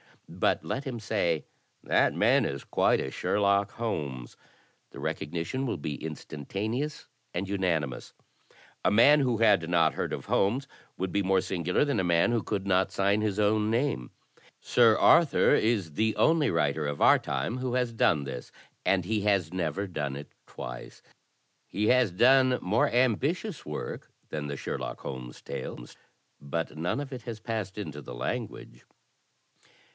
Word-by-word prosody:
But - - 0
let 130 - -3
him 125 -4 -4
say 85 -7 0 0.4
*That - - +2
man - - +3
is - - -4
quite - - +2
a 65 - -4
Sherlock 100 +3 +1
Holmes.' 70 - -4 0.6
The - - -10
recognition 85 - -3
will - - -2
be 75 0 -5
instantaneous 100 - -4 0.3
and 90 +3 -2
unanimous. 85 -9 -2 0.7
A - - +4
man 140 +8 +6
who 125 -4 +1
had 105 -7 +3
not 85 -3 +3
heard - - -3
of - - -5
Holmes 125 +8 +1 0.3
would 95 -1 -2
be 100 - +1
more 95 -1 +2
singular 90 - 0
than 140 -7 0
a - - +1
man 85 +5 +3
who 120 -2 +1
could 100 -1 -3
not 95 -1 +2
sign 100 +2 +1
his 105 -1 -1
own 105 +1 +2
name. 115 - 0 0.5
Sir 115 -3 +4
Arthur 170 -3 +5
is 105 -7 +1
the 110 +7 +1
only 160 -2 +3
writer 75 -2 0
of 70 0 -4
our - - +6
time 120 - -3
who 130 -1 -3
has 125 -2 0
done 80 -9 +2
this, 65 -3 -7 0.3
and 95 -3 +2
he 105 +2 0
has 100 -5 +1
never 90 +1 -2
done 75 -7 -4
it 70 +1 -9 0.2
twice. - - -9 0.6
He 105 +2 0
has 125 -3 +4
done 130 +6 +4
more 105 +6 +2
ambitious 135 - 0
work 75 - -6 0.2
than 75 -1 -4
the 70 -1 -5
Sherlock - - -5
Holmes 65 -2 -7
tales, - - -7 0.4
but 80 +3 -4
none 85 - -2
of 140 -1 -7
it 125 -2 -7
has 115 -3 -6
passed 110 -4 -4
into 75 -8 -6
the 60 - -9
language." - - -5
100 Hz, 160 wpm, -28 LUFS, 80-115 Hz, 0.7 s, man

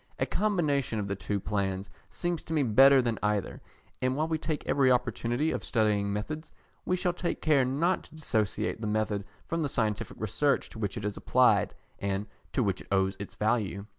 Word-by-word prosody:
A - - +1
combination 150 - 0
of 105 -2 -2
the 100 - -2
two 100 +1 -2
plans 95 -1 -2 0.2
seems 175 -2 -3
to 165 - -4
me 150 - +3
better 135 +3 +6
than 115 -2 -1
either, 105 -2 -1 0.4
and 130 +1 +1
while 155 +1 +1
we 160 -1 -1
take 155 -1 -3
every 135 -2 +3
opportunity 125 +3 +1
of - - -3
studying 105 -3 +1
methods, 150 +11 -4 0.3
we 180 - +2
shall 180 -1 0
take 175 0 -2
care 150 -4 +4
not 150 +9 +1
to - - -16
dissociate 110 -7 -1
the 110 - -2
method 105 -1 0 0.2
from 165 0 -1
the 145 - 0
scientific 110 -5 -1
research 135 +7 +1
to 110 - -10
which 105 0 -2
it 105 - -4
is 105 -1 -3
applied, - - +3 0.2
and 100 +1 -1 0.3
to 130 - +1
which 100 -3 -1
it - - -13
owes 95 0 +2
its 95 -1 -7
value. 105 -2 0
115 Hz, 195 wpm, -29 LUFS, 100-150 Hz, 0.4 s, better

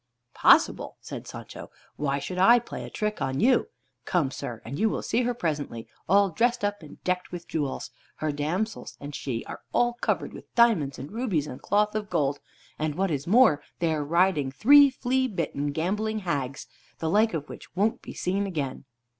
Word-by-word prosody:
"Possible!" - - +4
said - - -8
Sancho. - - -9 0.3
"Why 140 -2 -1
should 180 +6 -4
I 235 +6 +7
play 235 - -5
a - - -8
trick 210 0 -3
on 135 0 -1
you? 250 +2 +4 0.4
Come, 155 -7 +1
sir, 120 -3 -6
and 135 +7 -5
you 220 +1 +3
will - - -3
see 235 - +1
her 245 0 0
presently, 150 - -3 0.2
all 200 0 +5
dressed 240 +6 +1
up 205 -1 -2
and 155 - -13
decked 180 0 -1
with 175 -1 -7
jewels. 145 -4 -3 0.2
Her 155 -1 -2
damsels 170 +10 -3
and 145 +1 -8
she 125 -4 -4
are - - -8
all 240 0 +3
covered - - -1
with - - -12
diamonds, 210 -13 +4
and 135 +3 -8
rubies, 210 - -1
and 125 - -8
cloth 210 +1 +2
of 210 -1 -3
gold. 145 -5 0 0.4
And 155 -1 -1
what 190 +1 0
is 140 0 -2
more, 215 - +5 0.2
they 165 -2 +1
are 150 -1 -1
riding 165 -3 +2
three 285 - +7
flea 260 0 0
bitten 150 - -2
gambling 210 +8 -1
hags, 140 -7 -3 0.3
the 160 - -3
like 215 +4 +3
of 150 -2 -4
which - - -11
won't 210 +4 +1
be - - -9
seen 195 +2 -1
again." 145 -8 -4
180 Hz, 190 wpm, -27 LUFS, 145-215 Hz, 0.4 s, I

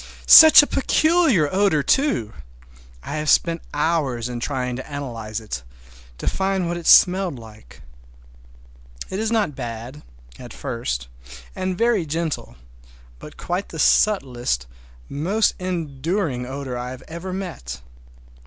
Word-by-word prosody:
Such 315 -2 +10
a - - +1
peculiar 305 - +2
odor, 190 -7 +2
too! 270 - 0 0.7
I - - -5
have 150 0 -2
spent 165 +2 +2
hours 145 -6 -1
in 120 -1 -5
trying 125 -1 -3
to 130 - -9
analyze 115 -6 -5
it, 105 - -6 0.6
to - - -8
find 190 -2 -1
what 175 - -2
it 170 -1 -6
smelled 185 -5 +5
like. 110 - -15 1.3
It 190 - -3
is 220 0 -1
not 215 -9 0
bad—at 115 - -10
first, - - -4 0.5
and 185 -1 -3
very 225 -7 +1
gentle, 160 - -4 0.6
but - - -12
quite 180 +3 -4
the 160 - -9
subtlest, 125 - +1 0.4
most 190 +10 0
enduring 165 -5 -3
odor 135 -1 -6
I 125 +1 -6
ever 170 +3 -7
met. 70 - -6
150 Hz, 125 wpm, -21 LUFS, 125-190 Hz, 1.3 s, Such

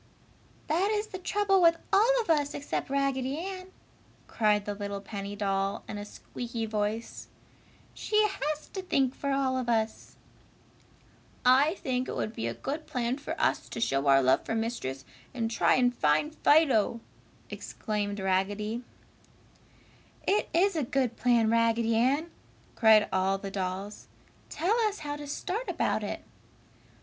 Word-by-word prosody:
"That 350 +6 +1
is 425 0 0
the 375 - -6
trouble 390 +1 +2
with 335 -1 +5 0.2
all 475 +5 +5
of 435 - -9
us 290 -2 +1
except 285 - -3
Raggedy 275 0 0
Ann!" 370 +2 -6 0.6
cried 210 -2 +1
the 205 - -2
little 200 0 -5
penny 200 0 -6
doll, 195 -1 -1
in 210 - -5
a 205 - -6
squeaky 230 +2 -6
voice, 215 +1 -3 0.7
"She 430 - -4
has 305 -6 -3
to 385 - -5
think 270 -8 +1
for 280 - -4
all 270 -1 +1
of 245 -2 -3
us!" 220 -1 -1 1.3
"I 275 +7 +5
think 255 -7 -2
it - - -4
would 215 - -2
be 115 - -3
a 115 - -3
good 300 +3 -5
plan 250 +2 -2
for - - -5
us - - 0
to - - -6
show 140 -10 0
our 135 0 +6
love 130 +1 +3
for 225 - -3
Mistress 140 - -3 0.3
and 225 -2 -1
try - - +3
and 245 -1 +3
find 155 - +1
Fido!" 280 -8 +3 0.5
exclaimed 205 -2 -3
Raggedy. 205 +5 -1 1.4
"It 410 +2 +2
is 365 +3 +3
a 315 - +1
good 255 -2 0
plan, 235 -3 +3
Raggedy 230 0 +2
Ann!" 280 +8 +1 0.4
cried 220 -2 +5
all 190 +1 +2
the 195 0 -7
dolls. 195 +2 -4 0.4
"Tell 410 +8 0
us 415 -4 -5
how 290 0 -3
to 290 0 -8
start 385 - -3
about - - 0
it." - - -5
240 Hz, 155 wpm, -29 LUFS, 205-300 Hz, 1.4 s, our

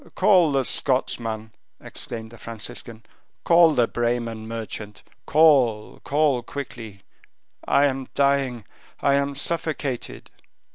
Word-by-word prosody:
"Call 185 -5 +4
the 135 -1 +1
Scotchman!" 115 -4 -1 0.3
exclaimed 110 -1 -6
the 115 - -14
Franciscan; 115 0 -6 0.4
"call 170 -2 +5
the 120 -2 +3
Bremen 115 -2 -2
merchant. 110 -2 -7 0.2
Call, 130 -9 +3
call 145 -3 +1
quickly. 115 -6 -8 0.6
I 140 - +4
am 135 -2 -2
dying. 140 -5 +1 0.4
I 140 - +3
am 140 0 0
suffocated." 145 -4 -3
125 Hz, 105 wpm, -23 LUFS, 115-140 Hz, 0.6 s, call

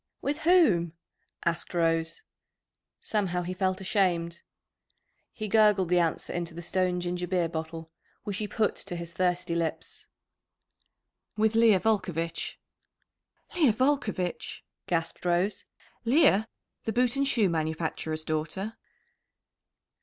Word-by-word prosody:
"With 290 +2 -1
whom?" 270 - +4 0.5
asked 170 +1 -1
Rose. 165 -1 +1 0.8
Somehow 185 -5 -1
he 180 +1 -3
felt 185 0 0
ashamed. 180 -3 0 0.9
He 215 - -5
gurgled 210 -4 +4
the 180 0 +4
answer 165 -2 0
into 170 -1 -4
the 170 - -6
stone 180 +1 0
ginger 180 0 -3
beer 180 -2 +1
bottle, 160 0 -6 0.3
which 205 -2 -3
he 210 - -2
put 215 0 0
to 175 - -4
his 170 0 -6
thirsty 180 0 0
lips. 165 -2 -3 1.3
"With 220 +1 +3
Leah 225 -4 +5
Volcovitch!" 180 -6 -1 1.0
"Leah 300 -10 +4
Volcovitch!" 220 -8 -1 0.2
gasped 165 -2 -2
Rose. 180 +3 +1 0.4
"Leah, 230 -4 +4 0.4
the 225 - -1
boot 245 +1 +2
and 275 0 +1
shoe 230 -7 +3
manufacturer's 160 -1 -2
daughter?" 160 +8 -3
180 Hz, 115 wpm, -28 LUFS, 170-215 Hz, 1.3 s, Leah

